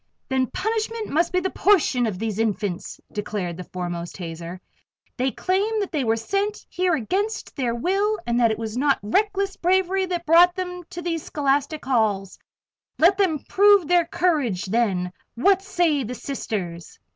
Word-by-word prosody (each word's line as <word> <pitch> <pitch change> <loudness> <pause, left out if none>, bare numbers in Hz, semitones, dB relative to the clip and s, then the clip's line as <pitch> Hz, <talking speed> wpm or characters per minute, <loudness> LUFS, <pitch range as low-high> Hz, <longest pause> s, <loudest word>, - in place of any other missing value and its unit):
"Then 260 -1 +1
punishment 440 - -2
must 335 +3 +1
be 365 - +2
the 380 - -2
portion 305 - +3
of 200 -4 -3
these 220 0 -3
Infants," 205 -4 -2
declared 205 -4 -3
the 180 - -7
foremost 175 -1 -5
hazer. 170 0 -7 0.6
"They 260 +1 +1
claim 400 - 0
that 400 - -2
they 295 -4 0
were 225 -1 +2
sent 395 - -2
here 360 -2 +1
against 385 - -2
their 240 -4 -1
will 395 - +1
and 240 0 +1
that 235 -2 +4
it 220 - -1
was 220 0 -5
not 280 +2 +2
reckless 395 - 0
bravery 375 +1 +1
that 350 -2 -3
brought 345 +2 +6
them 360 -1 -4
to 350 -1 -7
these 330 -2 -2
scholastic 285 +1 -1
halls. 210 -7 0 0.6
Let 370 +5 +4
them 325 -8 +1
prove 405 -4 +5
their 350 0 +4
courage 310 - 0
then 190 -4 0 0.2
what 385 +10 +3
say 350 -8 +1
the 250 +2 -5
Sisters?" 190 - -5
295 Hz, 165 wpm, -23 LUFS, -, 0.6 s, brought